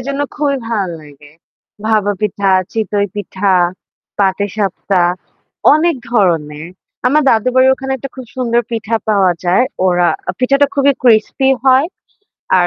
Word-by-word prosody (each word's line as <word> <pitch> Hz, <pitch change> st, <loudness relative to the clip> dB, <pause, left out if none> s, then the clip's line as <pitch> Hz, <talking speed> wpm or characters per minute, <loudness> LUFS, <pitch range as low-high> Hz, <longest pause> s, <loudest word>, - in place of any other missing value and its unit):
এজন্য 280 Hz, +1 st, -3 dB
খুবই 290 Hz, -2 st, 0 dB
ভালো 200 Hz, -6 st, -2 dB
লাগে। 145 Hz, 0 st, -16 dB, 0.6 s
ভাপা 215 Hz, -2 st, +1 dB
পিঠা, 200 Hz, -1 st, 0 dB, 0.2 s
চিতই 205 Hz, -2 st, -1 dB
পিঠা, 200 Hz, -1 st, -1 dB, 0.6 s
পাটি 200 Hz, 0 st, +1 dB
সাপটা 195 Hz, -2 st, 0 dB, 0.7 s
অনেক 325 Hz, -1 st, +1 dB
ধরনের। 165 Hz, -8 st, 0 dB, 0.4 s
আমার 300 Hz, +4 st, +3 dB
দাদুর 230 Hz, +2 st, +2 dB
বাড়ির 260 Hz, 0 st, +5 dB
ওখানে 265 Hz, 0 st, -5 dB
একটা 275 Hz, -, -7 dB
খুব 260 Hz, -1 st, -8 dB
সুন্দর 240 Hz, -2 st, +1 dB
পিঠা 225 Hz, 0 st, -2 dB
পাওয়া 195 Hz, -4 st, +3 dB
যায়। 180 Hz, +8 st, +3 dB, 0.2 s
ওরা 175 Hz, -1 st, +2 dB, 0.2 s
আ -, -, -6 dB
পিঠাটা 275 Hz, +3 st, +3 dB
খুবই 280 Hz, 0 st, +3 dB
ক্রিসপি 240 Hz, +3 st, +3 dB, 0.2 s
হয়। 265 Hz, +2 st, +4 dB, 0.7 s
আর 175 Hz, -, +3 dB
215 Hz, 135 wpm, -15 LUFS, 190-260 Hz, 0.7 s, বাড়ির